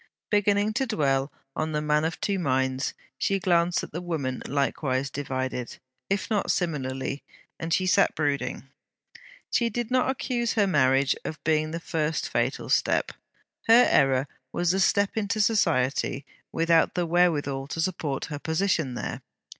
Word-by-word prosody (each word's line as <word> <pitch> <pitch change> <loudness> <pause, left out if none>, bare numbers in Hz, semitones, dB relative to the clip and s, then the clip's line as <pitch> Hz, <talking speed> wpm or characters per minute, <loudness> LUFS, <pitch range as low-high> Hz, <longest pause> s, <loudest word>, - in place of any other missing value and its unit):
Beginning 205 +1 +2
to 265 +3 0
dwell 140 - 0 0.2
on 155 0 -2
THE 150 - +1
MAN 150 +1 +2
OF 165 - -3
TWO 200 -2 -1
MINDS, 130 -3 0 0.2
she 195 - +1
glanced 175 -1 +2
at - - -8
the 170 - -5
woman 150 -8 -3
likewise 135 -1 -1
divided, 130 -3 -4 0.3
if 195 0 0
not 210 -3 0
similarly; 140 -5 -2 0.4
and 165 0 -4
she 185 +3 +2
sat 195 +2 +3
brooding. 145 -2 -2 0.8
She 235 -1 +2
did 240 +1 -4
not 255 0 +2
accuse 245 -3 -1
her 210 -3 +3
marriage 135 -6 +3
of 160 - -6
being 155 0 +1
the 165 +1 -4
first 160 -2 -2
fatal - - -1
step: - - +1 0.6
her 235 +2 +7
error 135 0 +3 0.2
was 175 -1 +1
the 190 - 0
step 200 +1 +2
into 215 0 -1
Society 140 - +1 0.3
without 165 0 +2
the 175 - 0
wherewithal 155 -6 +1
to 155 - -5
support 160 -5 -2
her 145 -3 -6
position 160 -5 0
there. - - -4
160 Hz, 155 wpm, -26 LUFS, 140-195 Hz, 0.8 s, her